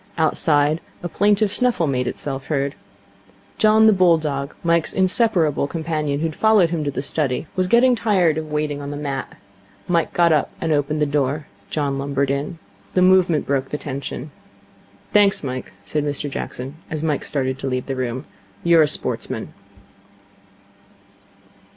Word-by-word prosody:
Outside, 155 -1 +2 0.2
a - - -1
plaintive 205 +3 +2
snuffle 245 -6 +1
made 125 -3 -1
itself 135 -2 -5
heard. 140 -2 -1 0.9
John, 215 0 +5
the 220 - +7
bull 180 -3 +5
dog, 140 -3 -4
Mike's 170 -1 +1
inseparable 185 - +2
companion, 155 -3 -2
who - - 0
had 160 -2 -3
followed 215 -6 +4
him 165 -3 -1
to 145 - -1
the 135 -1 -4
study, 140 -1 -1
was 185 -1 +1
getting 245 +5 +5
tired 185 -9 +2
of 155 -1 -7
waiting 150 -1 -2
on 140 - -6
the 145 - -5
mat. 140 -2 -5 0.5
Mike 170 -2 +1
got 170 -2 +3
up 150 - +1
and 165 - -1
opened 150 +1 0
the - - +3
door. 145 +1 -1 0.2
John 140 -3 -1
lumbered 140 0 0
in. 140 +4 -3 0.4
The 180 - +4
movement 185 -4 +4
broke 135 -1 -1
the 150 - -3
tension. 140 0 -6 0.8
'Thanks, 205 -4 +4
Mike,' 130 -2 -5
said 145 +9 -2
Mr 145 0 -2
Jackson, 135 +2 -6
as 155 -1 -3
Mike 155 -3 0
started 130 -2 -2
to - - -4
leave 130 -1 -2
the 135 - -3
room, 130 +2 -3 0.4
'you're 170 -1 +5
a 155 - +4
sportsman.' - - -2
150 Hz, 165 wpm, -21 LUFS, 140-170 Hz, 0.9 s, the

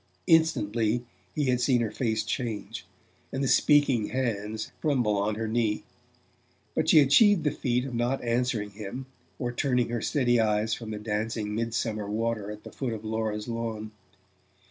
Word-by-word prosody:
Instantly 120 -8 +2 0.3
he 150 - +1
had 125 -1 +1
seen 125 -1 +3
her 110 -2 -1
face 110 -2 -1
change, 110 -1 -4 0.4
and 135 +1 -2
the - - +1
speaking 140 -6 +4
hands 110 -4 -2
tremble 125 -9 +2
on 105 +1 0
her 110 +1 -3
knee. 110 -1 0 0.9
But - - 0
she - - +7
achieved 165 +6 +5
the 150 - +2
feat 125 -3 -1
of 135 - -6
not 120 +3 0
answering 120 -3 0
him, 105 +5 -7 0.3
or 120 -1 -2
turning 125 -1 +1
her 120 -1 -2
steady 120 -5 +2
eyes 110 0 +1
from 115 -1 -5
the 110 - -4
dancing 105 0 -2
mid 115 +1 -2
summer 110 -3 -2
water 110 -1 -1
at 105 0 -8
the - - -10
foot 130 -4 -3
of 110 0 -7
Laura's 110 -1 -2
lawn. 115 -2 -4
115 Hz, 165 wpm, -27 LUFS, 105-125 Hz, 0.9 s, she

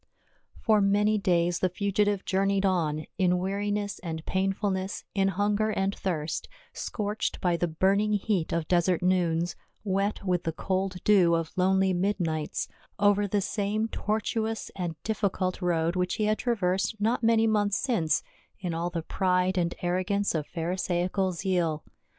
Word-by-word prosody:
OR 215 -2 +5
many 205 +2 +3
days 175 -2 +2
the 185 - +2
fugitive 200 +1 0
journeyed 195 +1 +1
on, 155 -5 0
in 180 -1 +3
wea 185 +2 -2
riness 205 0 -2
and 160 -4 -5
painfulncss, 190 0 -1
in 195 -1 +2
hunger 205 +2 +1
and 195 -2 0
thirst, 160 -6 -3 0.2
scorched 210 0 -3
by 180 -2 +1
the 175 +1 0
burning 195 +6 +2
heat 200 -4 0
of 165 -2 -1
desert 175 0 +2
noons, 175 -2 +1 0.3
wet 200 0 -1
with 180 -2 +1
the 165 - -2
cold 185 +1 -2
dew 185 -5 +5
of 165 -1 -2
lonely 190 +1 +3
midnights, 175 -5 -1 0.3
over 205 0 +3
the 200 +1 +1
same 210 +2 -1
tortuous 220 +1 -2
and 175 -4 -3
difficult 195 -4 -1
road 170 -1 +1
which 180 0 0
he 215 - -1
had 215 0 +1
traversed 205 -2 0
not 225 +4 +1
many 225 -1 +4
months 205 -2 +2
since 180 - +1 0.4
in 180 -3 -3
all 170 +2 -1
the 170 -2 -4
pride 185 +1 +1
and 175 -2 0
arrogance 185 +3 0
of 155 -3 -2
Pharisaical 180 +2 -1
zeal. 175 -3 -1
190 Hz, 150 wpm, -28 LUFS, 175-205 Hz, 0.4 s, OR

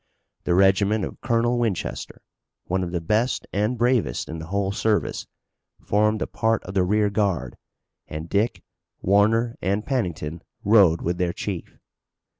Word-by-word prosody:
The 85 - +2
regiment 95 +2 +3
of - - -9
Colonel 120 0 +1
Winchester, 110 -7 -3 0.4
one 95 +1 -1
of 85 - -4
the 85 - -1
best 105 +9 0
and 105 +5 0
bravest 120 - +1
in 80 +1 -5
the 80 - -7
whole 100 +1 -1
service, 105 +1 0 0.5
formed 105 +1 +1
a - - -2
part 115 -1 0
of 90 - -8
the 95 - +2
rearguard, 100 - 0 0.5
and 80 +2 -6
Dick, 105 +7 0 0.4
Warner 110 +4 +3
and 100 +4 -1
Pennington 85 - -2 0.2
rode 100 -6 +5
with 85 +1 -1
their 90 -1 0
chief. 95 -3 -5
100 Hz, 145 wpm, -24 LUFS, 90-110 Hz, 0.5 s, rode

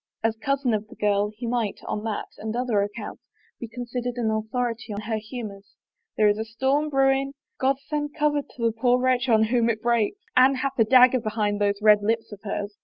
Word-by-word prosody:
As 225 0 +1
cousin 270 +1 0
of 215 0 -2
the - - -14
girl, 205 0 +1
he 240 - -5
might, 230 -3 -1
on 210 - -3
that 220 -2 -3
and 220 +1 -4
other 240 -4 +1
accounts, 205 +2 -5 0.4
be 235 - -6
considered 245 +1 -4
an 225 -2 0
authority 225 +1 -2
on 205 - -4
her 220 +1 -2
humors. 215 -3 -8 0.2
" - - -56
There 215 - +5
is 205 +1 +2
a - - -1
storm 265 +7 0
brewing 270 0 +2
— - - -55
God 270 +1 +2
send 295 0 -3
cover 295 -1 +1
to 255 - -14
the 230 - +3
poor 245 +2 +2
wretch 255 0 +1
on 220 -1 +5
whom 235 +1 +2
it 220 -1 0
breaks! 235 - +1 0.2
Anne 260 +2 +6
hath 265 +1 -2
a 225 - +6
dagger 255 +1 +6
behind 210 -2 -1
those 200 0 +1
red 210 -1 +6
lips 225 +2 -1
of 205 -1 -10
hers. 205 -1 -5
230 Hz, 220 wpm, -25 LUFS, 215-255 Hz, 0.4 s, Anne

